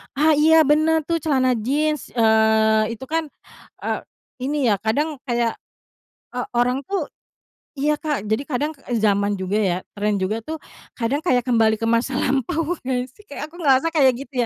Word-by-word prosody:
Ah, 305 +3 +4
iya 315 +2 +5
bener 310 +2 +3
tuh 330 +2 -1
celana 265 -4 +2
jeans, 300 +6 -1
eee, 220 -1 +3
itu 225 - -11
kan, 320 +3 -2 0.6
eee, - - -1 0.5
ini 280 -5 +1
ya 200 - +1
kadang 285 +8 -1
kayak, 235 -2 0 0.8
eee, 250 - -3
orang 250 +3 +1
tuh 365 0 -2 0.7
iya, 300 +2 +2
Kak, 300 - -2
jadi 220 +6 +1
kadang, 295 +2 -1 0.2
e 245 - -1
zaman 205 -1 +2
juga 190 +2 -2
ya, 185 -4 +1 0.2
trend 205 0 0
juga 215 +4 -1
tuh 315 +6 -5 0.4
kadang 250 +4 -1
kayak 250 -8 +2
kembali 225 -3 +3
ke - - -6
masa 230 +3 +1
lampau 310 +6 0
nggak 250 -1 -2
sih? 420 - -20
Kayak 285 +1 -6
aku - - -16
ngerasa 280 -1 +3
kayak 275 -5 +4
gitu 280 - -23
260 Hz, 170 wpm, -22 LUFS, 220-300 Hz, 0.8 s, iya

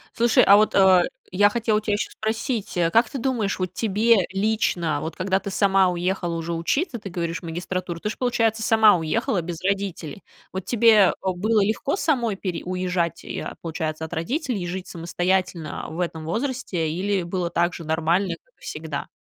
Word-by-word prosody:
Слушай, 235 0 +4
а 200 - +7
вот, 215 +1 +2
э, 190 -2 +6 0.3
я 205 +3 +4
хотела 220 0 +1
у - - +2
тя 215 - -2
ещё 205 - -2
спросить: 220 -1 -3
а 170 -1 +2
как 225 +2 +4
ты - - -5
думаешь, 235 -5 -1
вот 185 -1 -3
тебе 215 -1 +2
лично, 190 -6 0
вот 160 - -5
когда 190 +1 0
ты 200 - -6
сама 195 -1 +3
уехала 175 -1 -1
уже 165 +1 -3
учиться, 240 - -1
ты 200 - -7
говоришь, 170 -1 -3
в - - -25
магистратуру, 175 +1 -4
ты 210 - -3
же, - - -9
получается, 230 -3 +1
сама 220 -2 +5
уехала 175 +4 0
без 170 -1 -6
родителей? 195 -4 -2 0.3
Вот 190 -1 -5
тебе, 235 -1 +4
э, 205 -4 +6 0.2
было 215 +4 +2
легко 225 - -1
самой 255 - 0
пере 185 -3 -4
уезжать 180 -2 -2
и, - - -5
а, - - -6
получается, 160 -1 -3
от 160 - -9
родителей 240 - -2
и 175 - -3
жить 185 +1 -5
самостоятельно 175 0 -2
в 160 +2 -7
этом 165 -3 -3
возрасте 220 - -2
или 190 +3 -1
было 175 0 -2
так 175 +1 +1
же 170 - -7
нормально, 165 +4 0
как - - -36
и - - -36
всегда? - - -5
190 Hz, 195 wpm, -23 LUFS, 170-220 Hz, 0.3 s, а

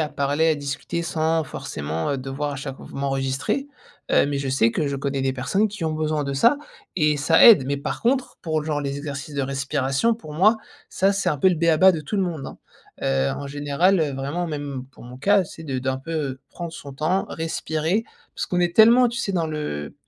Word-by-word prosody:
à 155 - 0
parler, 145 +3 +1
à 160 - +3
discuter, 145 +3 -4
sans 160 -1 0
forcément, 80 - -4
heu, 140 - -1
devoir, 135 +3 -3
à 140 - -5
chaque 135 -1 -6
fois, - - -12
m'enregistrer. 135 - -1 0.4
Heu, - - +4
mais 140 -1 -1
je 140 -1 -3
sais 130 -3 +3
que 150 +6 -1
je 140 - -2
connais 135 0 -2
des 135 0 +1
personnes 195 +12 0
qui 200 -4 -6
ont 160 - 0
besoin 155 -1 -1
de 140 - -3
ça 235 - +4 0.4
et 150 -3 +3
ça 160 +4 +5
aide 210 - +8
mais 140 +1 0
par 140 - -4
contre, 255 +2 0
pour, 155 -2 -1
genre, 150 -1 -1
les 140 -1 -3
exercices 145 0 -6
de 140 - 0
respiration, 140 - 0
pour 220 -9 -11
moi, 210 +8 +5 0.3
ça, 195 +1 +2
c'est 200 - 0
un 150 - +1
peu 190 - +5
le - - +1
béaba 170 +3 +5
de 165 - -3
tout 155 +8 -4
le 195 - +2
monde, 165 -6 -3
hein. - - -9 0.4
Heu, 65 0 +1
en 140 - -5
général, 145 +6 +1
heu, 150 -3 0
vraiment, 140 +6 -3
même 145 -4 -5
pour - - -15
mon 125 +1 -10
cas, 200 +4 +3
c'est 160 0 -11
de 135 -4 -3
d'un 130 +1 -2
peu, 135 +5 -10
heu, 135 -4 -3
prendre 170 -2 -6
son 140 -3 -9
temps, 155 +8 0
respirer 160 +4 -1 0.3
parce - - -3
qu'on 180 - 0
est 175 -1 +1
tellement, 235 +3 +7
tu 235 0 -5
sais, 200 - -1
dans 170 -3 0
le 150 - -4
150 Hz, 230 wpm, -23 LUFS, 135-170 Hz, 0.4 s, aide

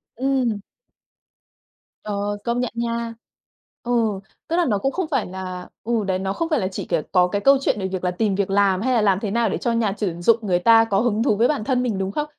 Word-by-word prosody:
Ừm. 255 -4 0 1.4
Ờ, 205 0 -2
công 235 +1 -1
nhận 250 - -1
nha, 235 0 -2 0.7
ừ, 245 - -3 0.6
tức 335 - -1
là 350 -1 +3
nó 210 -6 +1
cũng 270 +7 -1
không 370 0 -2
phải 270 -6 +1
là 185 -1 -7 0.2
ừ, 230 -1 0
đấy 185 -1 0
nó 190 0 -2
không 330 +9 -2
phải 305 -5 +2
là 185 - -1
chỉ - - -5
kiểu 170 -3 0
có 180 -1 +4
cái 200 +2 -2
câu 275 0 +6
chuyện 215 - 0
về 190 - -2
việc 185 -1 -4
là 180 - +1
tìm 195 +2 0
việc 200 -1 -1
làm 195 -1 +2
hay 255 +2 +1
là 230 - +3
làm 195 -2 +3
thế 205 -2 -3
nào 230 -1 +1
để - - -1
cho 235 - -1
nhà 230 -3 +1
chuyển 175 -5 -3
dụng 230 +5 +5
người 180 -4 +1
ta 225 +4 +6
có 200 -3 +1
hứng 225 -1 +1
thú 215 - +2
với 230 +4 +3
bản 290 -8 -1
thân 250 +1 0
mình, 230 -6 -1
đúng 190 0 -2
không? 295 +8 -2
215 Hz, 250 wpm, -22 LUFS, 195-240 Hz, 1.4 s, câu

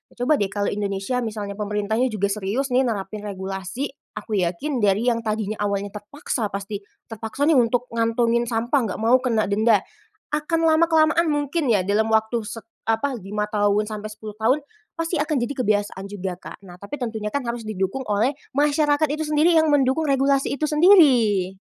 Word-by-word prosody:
Coba 250 +5 +2
deh 195 -2 -1
kalau 200 0 -1
Indonesia 200 +4 -2
misalnya 210 -2 -5
pemerintahnya 210 +4 0
juga 200 -2 0
serius 210 +7 -2
nih, 260 - +4
nerapin 210 -1 -4
regulasi, 195 +5 -4 0.3
aku 210 -4 -2
yakin 245 - -2
dari 205 +4 +2
yang 235 -1 +2
tadinya 215 -1 -2
awalnya 200 0 -2
terpaksa 220 - -4
pasti 200 +1 -5 0.3
terpaksa 225 +5 -4
nih 320 - +5
untuk 245 +1 +1
ngantongin 230 +1 +1
sampah, 235 +4 +1
enggak 215 -2 -4
mau 240 +3 +5
kena 225 -4 +1
denda 215 -1 +3 0.5
akan 325 +2 0
lama-kelamaan 320 0 +4
mungkin 290 0 -1
ya 200 -4 +3
dalam 215 +2 +1
waktu 220 +1 +1
set 225 +1 -8 0.2
apa, 245 +4 +1
5 210 +2 -3
tahun 205 0 +2
sampai 215 0 -6
10 215 0 -9
tahun 255 +7 +3 0.4
pasti 330 +1 -2
akan 305 0 -1
jadi 240 +4 -2
kebiasaan 205 -3 0
juga 190 -2 -4
Kak. - - -9
Nah, 175 - -11
tapi 275 +9 -6
tentunya 220 -3 -3
kan 285 - 0
harus 235 0 -3
didukung 200 +4 -2
oleh 220 +7 +2 0.2
masyarakat 295 +1 +3
itu 315 +1 -2
sendiri 305 +3 +4
yang 315 0 +4
mendukung 280 +2 +2
regulasi 275 0 +2
itu 305 +2 -1
sendiri, 270 - +5
225 Hz, 170 wpm, -23 LUFS, 205-280 Hz, 0.5 s, nih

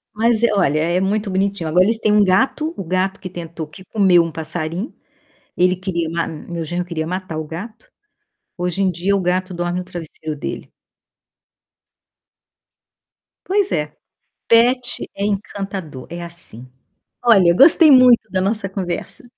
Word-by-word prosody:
Mas 230 +1 +2
é, 230 - +3
olha, 155 -7 +2
é 170 +3 +1
muito 205 +1 -1
bonitinho. 195 -3 -1
Agora 180 +4 +4
eles 225 +1 +1
têm 210 -1 +2
um 210 -1 +5
gato, 265 - +1
o - - -4
gato 185 +3 -1
que 185 - -7
tentou 165 -2 -7
que 185 +5 -14
comeu 185 -5 +4
um 165 - -5
passarinho, 165 - -4 0.6
ele 180 0 +3
queria 175 -3 -3
ma 170 0 -2
meu 165 +1 -6
genro 175 +3 -3
queria 160 -2 -3
matar 180 -2 -4
o 155 - -3
gato. 215 +8 -9 0.7
Hoje 180 +2 -2
em 190 - +3
dia 180 +4 0
o 195 - 0
gato 185 +1 -1
dorme 175 +1 -2
no - - -7
travesseiro 160 -3 -7
dele. - - -6 2.7
Pois 400 +1 +1
é, - - 0 0.6
pet 245 +2 +3
é 200 - -2
encantador, 195 -8 -4
é 175 0 -6
assim. 170 -8 -9 0.6
Olha, 190 -7 +5
gostei 310 - +7
muito 250 -4 +6
da 185 - 0
nossa 195 +1 -1
conversa. 185 +3 -5
185 Hz, 155 wpm, -19 LUFS, 170-210 Hz, 2.7 s, gostei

